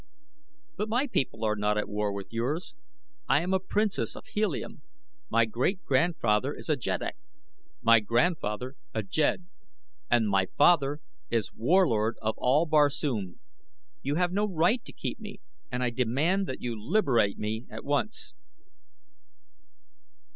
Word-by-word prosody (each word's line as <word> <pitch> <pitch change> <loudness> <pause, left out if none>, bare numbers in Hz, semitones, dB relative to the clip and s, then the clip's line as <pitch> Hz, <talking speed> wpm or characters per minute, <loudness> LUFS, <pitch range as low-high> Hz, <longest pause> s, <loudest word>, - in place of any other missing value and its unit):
"But 210 +1 -2
my 245 +5 +2
people 125 - -1
are 105 0 +1
not 105 0 0
at 105 - -1
war 105 0 -1
with 100 +1 -7
yours. 145 - -2 0.6
I 145 - +4
am 185 +2 -1
a 190 - +3
princess 210 +2 -1
of - - -10
Helium; 210 -8 -2 0.5
my 115 - +4
great 130 - -1
grandfather 135 -4 +1
is - - -9
a 155 - +4
jeddak; 135 - -3 0.7
my 115 0 +7
grandfather 120 - 0 0.2
a 110 - 0
jed; 155 - 0 0.6
and 120 -3 +3
my 95 -2 +2
father 145 -2 +4 0.3
is 115 -4 -1
Warlord 115 - +2
of 110 0 -1
all 140 +6 +3
Barsoom. 145 - +1 0.6
You 140 +2 -1
have 175 +1 +1
no 205 +3 +1
right 190 +7 +2
to - - -9
keep - - -5
me - - -9 0.3
and 125 - -1
I 125 - +1
demand 145 - +1
that 130 - -5
you 120 -2 -2
liberate 120 - +2
me 110 +3 -3
at - - -8
once." 180 - -2
130 Hz, 145 wpm, -28 LUFS, 110-175 Hz, 0.7 s, my